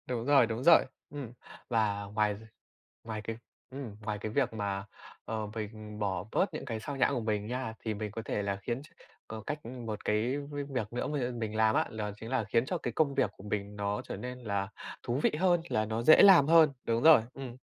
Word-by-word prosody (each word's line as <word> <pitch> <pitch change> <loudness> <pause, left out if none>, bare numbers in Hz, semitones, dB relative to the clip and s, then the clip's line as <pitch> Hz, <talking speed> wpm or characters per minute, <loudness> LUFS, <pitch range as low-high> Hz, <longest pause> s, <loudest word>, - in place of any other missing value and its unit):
Đúng 120 -2 -2
rồi, 140 -3 +6
đúng 115 +2 -3
rồi. 170 +1 +7 0.2
Ừm, 140 -5 -7 0.4
và 105 -3 +1
ngoài 105 0 0 0.7
ngoài 110 -2 -5
cái 115 +1 -5 0.3
ừm, 130 -6 -7
ngoài 105 0 -3
cái 110 - -3
việc 130 0 +1
mà, 100 -2 -3 0.4
ờ, 110 -1 -3
mình 105 -1 -6
bỏ 95 -4 -1
bớt 195 - +1
những - - -5
cái 115 -5 -3
xao 140 +6 -5
nhãng 135 +1 +2
của 130 - 0
mình 105 -2 -1
nha 125 -1 -3
thì 110 - -3
mình 105 0 -4
có 115 - -5
thể 105 - -1
là 100 0 -1
khiến 120 +5 -3
ch - - -14 0.4
có 110 0 -6
cách 150 0 -4
1 115 -3 -6
cái 115 +6 +1
với 145 0 -5
việc 125 -6 -4
nữa 125 - -2
mà, 150 -1 -2
ưm, 120 -2 -3
mình 110 -1 -3
làm 110 0 +3
á, - - +2
đó 105 -1 -2
chính 110 +2 -9
là 130 -3 +1
khiến 115 +3 +1
cho 180 - -2
cái 160 - -4
công 150 -3 +2
việc - - +2
của - - -12
mình 105 0 -3
nó 100 0 -2
trở - - -6
nên 125 +4 -6
là 100 -4 -2 0.4
thú 120 +2 -1
vị - - +4
hơn 175 -2 +3
là 110 - +1
nó 110 +1 -2
dễ 155 +6 +8
làm 190 -8 +8
hơn 160 -2 +7
đúng 115 0 0
rồi, 160 -6 +8
ừm. 130 -3 -7
115 Hz, 235 wpm, -31 LUFS, 105-135 Hz, 0.7 s, dễ